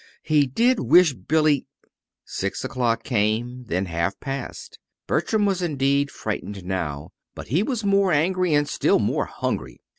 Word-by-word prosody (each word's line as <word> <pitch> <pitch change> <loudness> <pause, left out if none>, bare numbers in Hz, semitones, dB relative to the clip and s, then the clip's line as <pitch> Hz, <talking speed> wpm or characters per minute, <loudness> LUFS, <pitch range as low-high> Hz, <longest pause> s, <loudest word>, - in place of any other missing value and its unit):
He 150 -3 +3
did 235 - +2
wish 160 +4 +5
Billy 150 +6 +1 0.6
Six 100 0 -4
o'clock 120 -3 -1
came, 120 +2 -1
then 95 -2 -1
half 85 +2 -2
past. 135 -2 -6 0.3
Bertram 215 -2 +1
was 195 -2 0
indeed 140 -3 +1
frightened 105 -5 -5
now, 80 -6 -4 0.2
but - - -9
he 155 - +2
was 225 0 -2
more 200 -1 +3
angry, 180 +3 +1
and 145 0 +2
still - - +2
more - - 0
hungry. - - -4
140 Hz, 145 wpm, -23 LUFS, 110-175 Hz, 0.6 s, wish